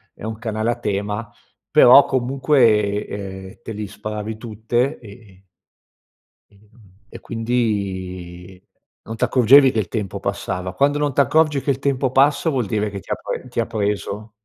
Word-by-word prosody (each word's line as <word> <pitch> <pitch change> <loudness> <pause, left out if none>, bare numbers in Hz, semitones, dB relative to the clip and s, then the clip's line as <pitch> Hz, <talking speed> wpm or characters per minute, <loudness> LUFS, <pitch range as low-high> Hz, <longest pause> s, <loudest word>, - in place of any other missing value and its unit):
è - - -14
un 110 0 -5
canale 110 0 -1
a - - -5
tema. 105 +2 -3 0.4
Però, 125 +3 +8
comunque, 120 -6 +2
ehm, 95 -1 -8
te - - -7
li 105 -1 -5
sparavi 105 +1 -6
tutte, 120 +5 -2
ehm, 100 -4 -15 1.0
ehm, 100 +1 -25 0.4
e - - -11
quindi, 95 -6 -3 0.4
non 115 - -7
t'accorgevi 130 +3 +5
che 110 - 0
il 105 - -2
tempo 105 -5 -4
passava. 90 0 -3
Quando 145 +1 +2
non 145 -1 -1
t'accorgi 145 +2 +2
che - - -4
il 135 - -3
tempo 135 -2 0
passa, 140 +4 +3
vuol 130 -5 -1
dire 105 +1 -1
che 100 -1 -6
ti - - -12
ha - - +1
pre - - -6
ti 120 - -4
ha 115 - +1
preso. 105 0 -3
110 Hz, 160 wpm, -20 LUFS, 100-130 Hz, 1.0 s, Però